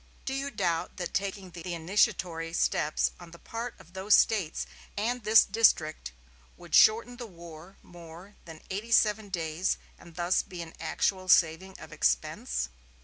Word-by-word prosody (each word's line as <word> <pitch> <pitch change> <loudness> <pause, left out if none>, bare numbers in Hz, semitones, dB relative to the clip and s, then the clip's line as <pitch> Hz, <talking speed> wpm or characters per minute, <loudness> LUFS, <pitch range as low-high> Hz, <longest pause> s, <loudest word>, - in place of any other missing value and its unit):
Do 265 - -2
you 275 +1 -2
doubt 180 -9 -2
that 175 -2 -5
taking 195 -1 -3
the 170 0 -6
initiatory 165 -1 0
steps 155 -2 +1
on 175 -1 -12
the 170 - -13
part 230 +6 -6
of 170 - -18
those 195 +2 +4
States 195 -8 +1 0.3
and 240 +4 -1
this 220 +1 +6
District 160 - +2 0.5
would - - -14
shorten 230 +3 +5
the 240 -2 -7
war 170 0 -13
more 175 +3 -13
than 160 -2 -12
eighty 210 +5 -5
seven 215 -2 +3
days, 170 0 -1 0.2
and 170 -2 -15
thus 175 +1 +1
be 180 -3 -8
an 160 - -12
actual 185 -1 -1
saving 180 +3 +3
of - - -11
expense?" - - -1
180 Hz, 155 wpm, -29 LUFS, 165-210 Hz, 0.5 s, this